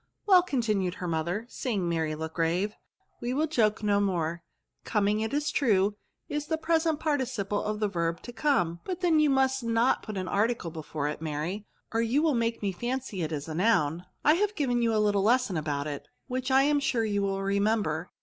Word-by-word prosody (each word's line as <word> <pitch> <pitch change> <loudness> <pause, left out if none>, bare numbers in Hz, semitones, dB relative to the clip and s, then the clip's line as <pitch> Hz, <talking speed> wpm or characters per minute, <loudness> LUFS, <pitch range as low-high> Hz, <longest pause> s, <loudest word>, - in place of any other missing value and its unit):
" - - -51
Well," 375 -3 +7
continued 215 - 0
her 180 - -5
mother, 170 +6 -1
seeing 215 -8 -2
Mary 160 -2 -1
look 160 +1 -5
grave, 170 +5 +1
'^ - - -24 0.5
we 245 +2 -2
will 305 +3 +2
joke 225 -8 +1
no 205 -1 +3
more* 170 -4 -1 0.4
Coming, 210 -1 +1
it 220 +1 -2
is 295 +2 0
true, 205 -6 +2 0.3
is 295 0 -3
the 320 - 0
present 320 -1 +1
participle 250 -9 -1
of 210 0 -3
the 210 - +1
verb 170 -3 -1
to 240 - -8
come; 225 - +1
but 370 -1 -4
then 335 -4 +4
you 305 -1 +4
must 265 -1 +2
not 230 +2 +2
put 215 -3 -6
an 185 -1 -3
article 210 -4 0
before 155 -2 -4
it, 150 +1 -4
Mary, 160 +7 -3 0.3
or 225 - +2
you 245 +7 +2
will 320 - +3
VERBS. - - +1
S35 - - +2
make 230 0 -1
Die 200 -2 0
fancy 240 0 -3
it 160 -1 -2
is 145 -1 -4
a 160 - -5
noun. 175 -3 +1 0.2
I 300 - +7
have 415 +4 0
given 245 -7 +1
you 230 -1 +2
a 220 - +1
little 205 -2 +2
lesson 235 -1 +2
about 145 -2 -2
it, 145 -2 -5 0.2
whith 255 0 -2
I 265 +1 +5
am 290 +1 +3
sure 245 -5 0
you 205 -2 0
will 195 0 -1
remember. 200 -4 0
210 Hz, 220 wpm, -28 LUFS, 175-260 Hz, 0.5 s, Well